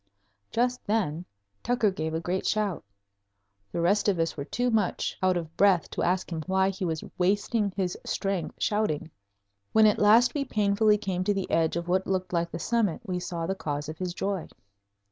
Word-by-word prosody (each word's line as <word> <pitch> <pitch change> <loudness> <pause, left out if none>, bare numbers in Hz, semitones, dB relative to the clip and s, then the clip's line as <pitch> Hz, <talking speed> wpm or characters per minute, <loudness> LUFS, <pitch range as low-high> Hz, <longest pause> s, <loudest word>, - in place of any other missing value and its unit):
Just 250 +1 0
then 180 -6 0 0.4
Tucker 240 -4 +2
gave 160 -3 -3
a - - 0
great 180 +3 -2
shout. 210 -5 0 0.9
The 170 - -2
rest 200 +5 +3
of 195 - +1
us 165 0 0
were 140 - -5
too 245 +8 -1
much 215 -5 0
out 185 -1 +3
of 165 -1 -6
breath 195 -4 +3
to - - -3
ask 185 +1 0
him 160 -1 -3
why 190 0 +2
he 190 - -6
was 160 -3 -2 0.2
wasting 205 +3 +1
his 185 -2 -1
strength 195 -3 -2
shouting. 170 -7 -1 0.6
When 220 0 +6
at 210 - +4
last 220 +4 +5
we 290 - 0
painfully 210 -3 +2
came 190 -3 -2
to 205 - +2
the 195 -1 -3
edge 165 -1 +2
of 170 0 -3
what 185 +1 +1
looked 185 -1 -1
like 170 0 +1
the 165 - -5
summit 215 0 0
we 180 -2 -2
saw 175 -2 -4
the 190 - -1
cause 150 -5 -4
of 155 - -7
his 180 -1 -3
joy. 195 -3 -2
190 Hz, 195 wpm, -27 LUFS, 170-210 Hz, 0.9 s, When